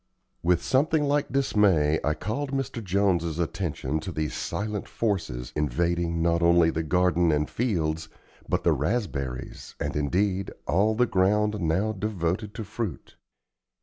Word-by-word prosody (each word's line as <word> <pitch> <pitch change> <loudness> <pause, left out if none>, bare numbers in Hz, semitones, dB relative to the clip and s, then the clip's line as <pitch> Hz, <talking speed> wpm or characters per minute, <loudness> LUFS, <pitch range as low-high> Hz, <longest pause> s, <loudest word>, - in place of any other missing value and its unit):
With 85 0 +2
something 150 +3 +2
like 145 -1 +1
dismay 100 - +3
I 75 0 +1
called 135 +8 -3
Mr. 135 -4 -3
Jones's 90 -4 +1
attention 80 -4 -2
to 85 +4 -6
these 75 -2 -2
silent 105 -1 -3
forces, 80 - -2
invading, 85 +3 0
not 85 0 +2
only 85 -1 +5
the 80 - -1
garden 90 0 +2
and 75 0 +1
fields, 80 -9 -1 0.4
but - - 0
the - - +4
raspberries 70 - -3
and, - - -3
indeed, 95 +6 0 0.2
all 105 +5 +2
the 125 +2 +4
ground 105 +1 +2
now 90 +7 +1
devoted 100 -1 -2
to 115 - -4
fruit. 105 -4 -5
90 Hz, 140 wpm, -26 LUFS, 80-105 Hz, 0.4 s, only